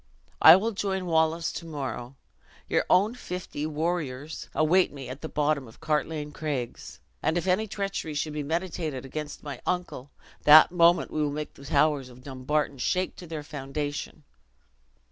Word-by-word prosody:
I - - +11
will 215 +5 +1
join 190 -2 -2
Wallace 165 0 +1
to 165 - -7
morrow. 135 -4 -5 0.5
Your - - +1
own 200 +5 +4
fifty 180 -9 -5
warriors 155 -2 -3
await 175 +4 +3
me 135 -3 -8
at 130 +3 -7
the 160 - -5
bottom 145 -3 0
of 110 - -16
Cartlane 150 0 -1
Craigs; 145 -6 -5 0.2
and 160 +3 +1
if 170 - -1
any 190 +4 +2
treachery 195 -6 -3
should 150 +1 -2
be 150 - -2
meditated 160 -3 -3
against 150 +2 -6
my 140 -4 -7
uncle, 175 -7 -3 0.3
that 155 +3 +9
moment 175 0 +4
we 155 - -1
will 150 - +1
make 150 +1 -5
the 140 - -14
towers 145 -2 +2
of 125 0 -15
Dumbarton 140 +1 -2
shake 185 +8 0
to 175 - -10
their 155 -2 -5
foundation." 145 0 -5
155 Hz, 165 wpm, -27 LUFS, 145-175 Hz, 0.5 s, I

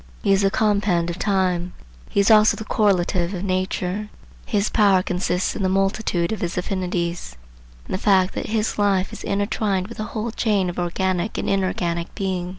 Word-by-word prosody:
He 200 - +4
is 195 - +3
the 195 - +3
compend 200 -5 +1
of 170 - -8
time; 185 -3 0 0.4
he - - 0
is 200 +3 +4
also 215 0 +6
the 220 - -6
correlative 185 -3 +1
of 180 - -5
nature. 185 +2 -2 0.4
His 210 -2 +1
power 195 -4 +3
consists 180 0 -1
in - - -4
the 190 - +1
multitude 195 -2 0
of 220 - -3
his 175 0 -3
affinities, 180 - -3 0.5
in - - -9
the 185 - -1
fact 190 -3 +3
that - - -4
his 215 0 -1
life 195 -2 +1
is - - -8
intertwined 200 -1 -1
with 230 - -10
the 215 - -2
whole 220 +1 -4
chain 205 -5 0
of 175 - -7
organic 180 +2 -1
and - - -2
inorganic 175 -3 -1
being. 185 -2 -2
190 Hz, 185 wpm, -22 LUFS, 180-205 Hz, 0.5 s, also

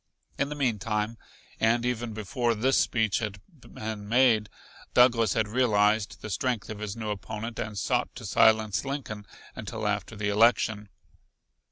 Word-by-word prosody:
In 140 - +1
the 150 - -4
meantime, 110 -4 -1 0.4
and 115 +2 +2
even 120 -1 -2
before 115 +3 -1
this 130 +5 +2
speech 110 -4 +1
had 105 -3 -4
been 110 - -8
made, 115 -4 +4 0.5
Douglas 115 -5 +5
had 110 -2 +1
realized 105 -3 +2
the 110 - -5
strength 120 +2 -1
of 105 - -7
his 105 -1 -4
new 110 -2 -4
opponent, 110 +3 -5
and 105 -1 -4
sought - - 0
to - - -8
silence 110 -2 +3
Lincoln 130 -7 -5 0.3
until 110 - -4
after 105 0 -2
the 105 -1 -2
election. 105 -1 +3
110 Hz, 150 wpm, -27 LUFS, 105-120 Hz, 0.5 s, Douglas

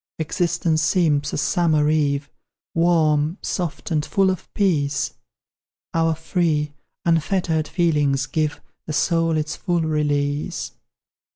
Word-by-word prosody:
Existence 160 0 0
seems 155 -3 +2
a - - -3
summer 155 -2 +2
eve, 145 -2 +1 0.5
Warm, 160 -1 +2
soft, 175 -1 -3
and 150 -2 +1
full 190 +3 +2
of 185 - -6
peace, 145 -8 +1 0.8
Our 165 -1 +2
free, 160 -2 0 0.3
unfettered 165 -1 +1
feelings 150 -5 +1
give 155 -1 -1 0.3
The 155 - -3
soul 165 +1 +2
its 155 0 -2
full 175 -3 -1
release. 150 0 -1
155 Hz, 110 wpm, -22 LUFS, 150-170 Hz, 0.8 s, seems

